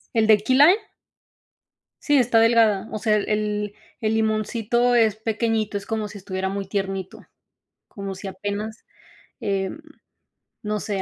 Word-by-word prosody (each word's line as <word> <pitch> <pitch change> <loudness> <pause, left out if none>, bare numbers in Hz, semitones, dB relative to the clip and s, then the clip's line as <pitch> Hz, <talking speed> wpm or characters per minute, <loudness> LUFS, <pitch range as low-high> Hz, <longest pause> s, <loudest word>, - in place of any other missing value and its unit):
¿El 225 -1 +3
de 215 -1 +6
key 255 +5 +1
lime? 310 +7 +7 1.3
Sí, 290 -1 +3
está 235 -3 +4
delgada, 225 -3 +3
o 215 - -4
sea, 215 0 +2
el 205 - -2
el 210 -1 -1 0.3
el 220 0 0
limoncito 225 +2 +1
es 220 -3 +3
pequeñito, 220 -1 -1
es 200 - -4
como 220 -1 -3
si 205 - -11
estuviera 190 -1 -3
muy 195 0 -4
tiernito, 195 -1 -4 0.6
como 195 -1 -6
si 195 +1 -7
apenas, 205 +3 -5 0.6
em, 195 +5 -2 0.8
no 210 -1 -2
sé, 200 -2 -3
215 Hz, 145 wpm, -23 LUFS, 200-225 Hz, 1.3 s, lime